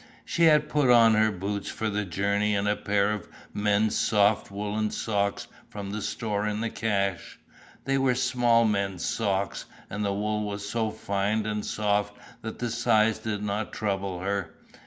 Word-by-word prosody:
She 170 - +2
had 150 -2 +5
put 145 -4 +2
on 115 -2 +7
her 110 0 +3
boots 100 +1 -4
for 110 - -3
the 105 0 -1
journey 100 +4 0
and 100 +1 0
a 105 - +2
pair 100 0 +1
of 105 -4 -4 0.3
men's 105 +1 +1
soft 105 -1 +2
woollen 105 +2 -2
socks 100 -2 -1 0.2
from 100 -1 -6
the 105 +1 -4
store 105 -1 -2
in 105 0 -2
the 115 0 -2
cache. 100 -4 -2 0.5
They 135 +1 +1
were 130 -2 +2
small 120 -2 +3
men's 100 -4 -1
socks 100 -3 -1 0.3
and 105 +2 -3
the 100 - 0
wool 105 +1 -1
was 100 0 -4
so 110 +1 -1
fine 105 +1 -1
and 105 -1 -2
soft 105 -1 -1 0.2
that 110 - -6
the 120 -1 -3
size 110 -2 +2
did 105 -2 -3
not 105 +1 -3
trouble 95 -3 -2
her. 100 0 -2
105 Hz, 175 wpm, -27 LUFS, 100-110 Hz, 0.5 s, on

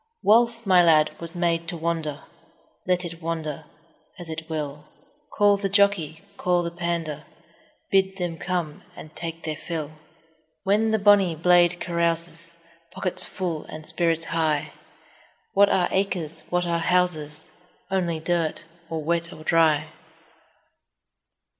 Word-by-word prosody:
Wealth, 230 +1 +3
my 185 -2 +6
lad, 155 -2 +5
was 170 +1 -6
made 170 -1 0
to 170 - -3
wander, 160 -3 -3 0.6
Let 180 0 +2
it 170 0 -8
wander 160 -2 -4 0.5
as 175 -3 -9
it 160 +1 -6
will; 150 -2 -4 0.5
Call 205 -1 +5
the 195 0 -2
jockey, 195 -6 +2
call 180 -1 +1
the 170 - -3
pander, 170 -3 -3 0.7
Bid 190 0 +2
them 175 -3 -3
come 175 -5 -3
and 155 0 -12
take 165 -1 -6
their 155 -1 -3
fill. 155 -2 -5
20 155 0 -19 0.6
When 210 +3 +2
the 220 - +2
bonny 200 -4 +4
blade 175 +1 +4
carouses, 170 -1 0 0.3
Pockets 185 -1 0
full, 170 -5 -4
and 155 0 -9
spirits 165 -1 +2
high— 155 -2 0 0.8
What 200 +1 +5
are 180 -2 +2
acres? 175 -5 -1
What 180 0 0
are 170 -1 0
houses? 160 -4 0 0.4
Only 175 -4 0
dirt, 165 -1 -1 0.2
or 160 -1 -3
wet 170 +1 0
or 155 - -11
dry. 155 -2 +3
170 Hz, 135 wpm, -24 LUFS, 160-180 Hz, 0.8 s, my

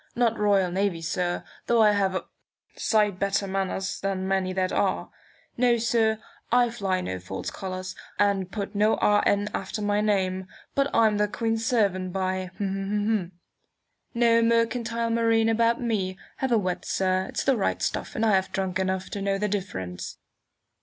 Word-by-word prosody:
Not 235 -2 +1
Royal 200 -3 +3
Navy, 185 -3 0
sir, 175 +2 -1 0.2
though 235 -1 +5
I 210 - +6
have 195 -2 +1
a - - -2 0.5
sight 210 -4 +1
better 200 0 +1
manners 195 0 -2
than 190 -1 -2
many 190 -1 0
that 185 0 0
are. - - 0 0.5
No, 240 -1 +4
sir, 225 -1 +2 0.3
I 240 0 +4
fly 195 -5 -1
no 95 - -4
false 95 +1 -5
colours, 185 0 -5 0.2
and 195 -2 +1
put 200 -1 -4
no 210 +2 +3
R. 205 0 +3
N. 205 +1 +2
after 195 +2 -3
my 205 0 +1
name; 190 -3 0 0.3
but 275 0 +2
I'm 215 -2 +3
the 210 - +3
Queen's 225 +1 -1
servant, 190 -6 +1
by! 185 -1 -1
No 205 +3 -1
mercantile 230 0 +1
marine 225 -1 +3
about 230 +1 +2
me! 200 -6 -1 0.2
Have 265 -1 -1
a 235 - +5
wet, 185 -3 -1
sir! 185 0 0
It's - - -2
the 270 - +3
right 205 - 0
stuff, - - -3
and 225 - +1
I 220 - +4
have 190 -1 +2
drunk 190 0 -1
enough 190 0 -1
to 200 - -4
know 195 0 0
the 210 +1 0
difference." 95 - -4
200 Hz, 165 wpm, -26 LUFS, 185-225 Hz, 0.5 s, I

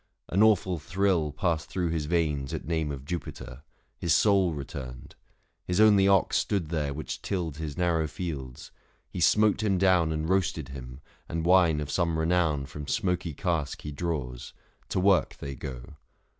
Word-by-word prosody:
An 95 - +2
awful 95 -5 +3
thrill 90 -2 +1
Passed 80 0 -1
thro' 90 -3 -1
his 80 -2 -2
veins 75 -5 0
at - - -6
name 80 -2 -1
of 70 -1 -7
Jupiter. 70 -5 -6 0.4
His 80 -3 +2
soul 95 -1 +4
returned; 65 -4 -7 0.5
his 90 +2 -1
only 105 -3 +6
ox 100 -2 +3
stood 95 -7 -1
there 75 -4 -1
Which 75 +3 -5
tilled 85 -7 -3
his 75 -3 -5
narrow 85 -3 +1
fields; 75 -6 -6 0.4
he - - -5
smote 105 +6 +4
him 100 -3 +1
down 90 -4 +3
And 80 0 -2
roasted 85 -5 0
him, 65 0 -9 0.3
and 80 0 -2
wine 85 -4 +5
of 75 -1 -4
some 85 -1 0
renown 80 -3 +1
585 - - -15
From 75 -1 -7
smoky 90 -5 -1
cask 85 -5 -2
he 75 - -5
draws; 70 -6 -4 0.4
to - - 0
work 95 0 +3
they 70 -1 -6
go. 65 +3 -8
80 Hz, 170 wpm, -28 LUFS, 75-90 Hz, 0.5 s, only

